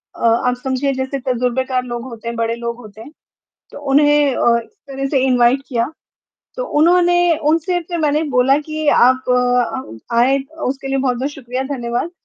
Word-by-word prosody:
अ, -, -, -3 dB
आप 235 Hz, +2 st, +2 dB
समझिए 265 Hz, +1 st, -1 dB
जैसे 265 Hz, +1 st, -3 dB
तजुर्बेकार 255 Hz, +1 st, 0 dB
लोग 240 Hz, -1 st, -5 dB
होते 235 Hz, -3 st, -9 dB
हैं, 235 Hz, -, -3 dB
बड़े 230 Hz, 0 st, -1 dB
लोग 235 Hz, 0 st, -5 dB
होते 215 Hz, -3 st, -13 dB
हैं 285 Hz, -, -11 dB, 0.6 s
तो -, -, -10 dB
उन्हें 290 Hz, -1 st, +4 dB
अ, 235 Hz, 0 st, +3 dB
इस -, -, -23 dB, 0.2 s
तरह 275 Hz, 0 st, -3 dB
से 275 Hz, -, +1 dB
इनवाइट 250 Hz, +1 st, +3 dB
किया। 240 Hz, +2 st, -1 dB, 0.6 s
तो -, -, -2 dB
उन्होंने 350 Hz, +1 st, +4 dB
उनसे 330 Hz, +3 st, +1 dB
फिर 345 Hz, +1 st, -5 dB
मैंने 300 Hz, 0 st, +1 dB
बोला 255 Hz, +2 st, +4 dB
कि 310 Hz, +1 st, -5 dB
आप 260 Hz, 0 st, +4 dB
अ, 245 Hz, -, -1 dB
आए 260 Hz, +4 st, +4 dB, 0.3 s
उसके 270 Hz, +1 st, -3 dB
लिए 270 Hz, 0 st, 0 dB
बहुत-बहुत 260 Hz, +1 st, -1 dB
शुक्रिया, 255 Hz, -2 st, -5 dB
धन्यवाद। 255 Hz, +2 st, -3 dB
260 Hz, 170 wpm, -18 LUFS, 240-290 Hz, 0.6 s, उन्हें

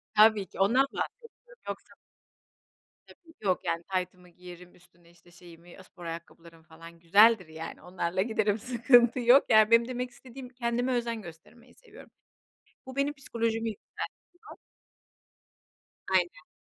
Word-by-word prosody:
Tabii 215 Hz, -2 st, +5 dB
ki, -, -, -14 dB
ondan 245 Hz, +8 st, +4 dB
bahsediyorum. 485 Hz, +1 st, -8 dB
Yoksa -, -, -7 dB, 1.1 s
Tabii, 330 Hz, -2 st, -19 dB
yok. 185 Hz, -2 st, +1 dB
Yani, 165 Hz, +1 st, -2 dB
taytımı 180 Hz, -1 st, -5 dB
giyerim 180 Hz, 0 st, -14 dB
üstüne, 175 Hz, -1 st, -24 dB
işte, 175 Hz, 0 st, -23 dB
şeyimi 175 Hz, 0 st, -16 dB
spor 175 Hz, -2 st, -14 dB
ayakkabılarım 165 Hz, 0 st, -10 dB
falan 165 Hz, +1 st, -15 dB
güzeldir, 200 Hz, +2 st, +5 dB
yani, 160 Hz, +1 st, -9 dB
onlarla 180 Hz, 0 st, -3 dB
giderim. 215 Hz, -1 st, 0 dB
Sıkıntı 245 Hz, +1 st, +3 dB
yok 245 Hz, +3 st, +5 dB
Yani, 215 Hz, 0 st, +5 dB
benim 230 Hz, +1 st, +5 dB
demek 250 Hz, 0 st, -4 dB
istediğim 250 Hz, +1 st, -12 dB
kendime 245 Hz, 0 st, -2 dB
özen 235 Hz, -2 st, -2 dB
göstermeyi 205 Hz, +9 st, -15 dB
seviyorum. 465 Hz, -1 st, -16 dB, 0.8 s
Bu 260 Hz, +1 st, -10 dB
benim 280 Hz, +1 st, 0 dB
psikolojimi 230 Hz, -4 st, -2 dB
yükseltiyor. 210 Hz, -, -9 dB, 1.9 s
Aynen. 175 Hz, -4 st, 0 dB
215 Hz, 125 wpm, -28 LUFS, 175-245 Hz, 1.9 s, Tabii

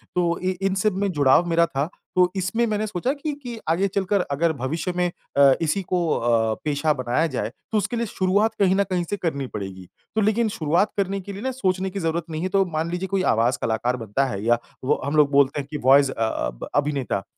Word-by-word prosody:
तो 170 Hz, -1 st, +1 dB
इ 185 Hz, 0 st, +1 dB
इन 195 Hz, 0 st, +1 dB
सब 205 Hz, +2 st, +1 dB
में 200 Hz, 0 st, 0 dB
जुड़ाव 145 Hz, +1 st, +4 dB
मेरा 170 Hz, 0 st, +4 dB
था 150 Hz, 0 st, -2 dB, 0.3 s
तो 180 Hz, 0 st, +4 dB
इसमें 190 Hz, +6 st, 0 dB
मैंने 215 Hz, 0 st, -1 dB
सोचा 210 Hz, +5 st, -1 dB
कि, 300 Hz, +1 st, -4 dB
कि 245 Hz, -5 st, -8 dB
आगे 180 Hz, +5 st, +2 dB
चलकर 195 Hz, 0 st, 0 dB
अगर 160 Hz, +3 st, +1 dB
भविष्य 150 Hz, +6 st, -3 dB
में 180 Hz, 0 st, +1 dB, 0.3 s
अ, 140 Hz, -1 st, +7 dB
इसी 165 Hz, +4 st, +1 dB
को 180 Hz, -2 st, 0 dB
अ, 115 Hz, -2 st, +1 dB
पेशा 150 Hz, +1 st, +1 dB
बनाया 130 Hz, +4 st, 0 dB
जाए 105 Hz, -, -1 dB, 0.2 s
तो 220 Hz, -, +2 dB
उसके 210 Hz, +4 st, -1 dB
लिए 235 Hz, -, 0 dB
शुरुआत 205 Hz, +2 st, +1 dB
कहीं 190 Hz, -2 st, +4 dB
न 200 Hz, -, +3 dB
कहीं 180 Hz, -2 st, -1 dB
से 205 Hz, -, -1 dB
करनी 140 Hz, -7 st, -2 dB
पड़ेगी। 95 Hz, -4 st, -7 dB, 0.3 s
तो 220 Hz, -, +2 dB
लेकिन 220 Hz, +2 st, +2 dB
शुरुआत 175 Hz, +1 st, +1 dB
करने 195 Hz, 0 st, 0 dB
के 200 Hz, +2 st, -8 dB
लिए 200 Hz, -, -7 dB
ना 260 Hz, +2 st, -1 dB
सोचने 190 Hz, -6 st, -1 dB
की 195 Hz, +1 st, -5 dB
ज़रूरत 165 Hz, 0 st, -1 dB
नहीं 155 Hz, 0 st, -4 dB
है, 185 Hz, -, -1 dB
तो 195 Hz, 0 st, +3 dB
मान 165 Hz, -1 st, -3 dB
लीजिए 180 Hz, +2 st, -2 dB
कोई 190 Hz, 0 st, 0 dB
आवाज़ 120 Hz, -3 st, +2 dB
कलाकार 120 Hz, +3 st, 0 dB
बनता 115 Hz, +4 st, -1 dB
है 100 Hz, -6 st, -4 dB
या 120 Hz, +1 st, +4 dB, 0.3 s
वो 130 Hz, -, +1 dB
हम 140 Hz, +2 st, -1 dB
लोग 150 Hz, -2 st, +4 dB
बोलते 140 Hz, +1 st, +3 dB
हैं 140 Hz, -, -11 dB
कि 150 Hz, -, -3 dB
वॉइस 140 Hz, +1 st, +6 dB
अ, 110 Hz, -, -1 dB
ब -, -, -8 dB
अभिनेता 140 Hz, -8 st, 0 dB
170 Hz, 230 wpm, -23 LUFS, 140-195 Hz, 0.3 s, अ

